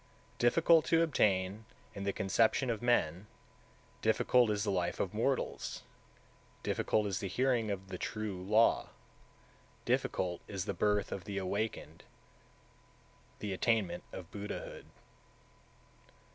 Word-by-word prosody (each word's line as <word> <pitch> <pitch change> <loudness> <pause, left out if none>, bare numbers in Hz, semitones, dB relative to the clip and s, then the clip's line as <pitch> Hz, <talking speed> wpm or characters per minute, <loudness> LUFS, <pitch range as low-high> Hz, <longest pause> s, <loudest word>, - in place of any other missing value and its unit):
182. 120 - +4
Difficult 165 +4 +5
(to 165 0 +4
obtain) 105 - +1 0.3
is 100 - -6
the 100 - +1
conception 115 +6 +2
of 110 - -3
men, 105 -6 +1 0.7
difficult 125 -3 +3
is 105 -1 0
the 105 - 0
life 90 -2 -1
of - - -1
mortals, - - -1 0.8
difficult 110 - +1
is 100 -2 -1
the 100 - -3
hearing 120 +2 +1
of 95 -1 -4
the - - -6
True 105 -4 -4
Law, 110 +5 +3 1.0
difficult 90 -2 0
is 95 -2 -4
the - - -2
birth 105 -1 +1
of 90 - -5
the 100 -1 -4
Awakened 100 +3 -3 1.3
(the 105 -2 -4
attainment 95 -4 0
of 90 -1 -9
Buddhahood). 105 0 -6
105 Hz, 125 wpm, -33 LUFS, 95-115 Hz, 1.3 s, Difficult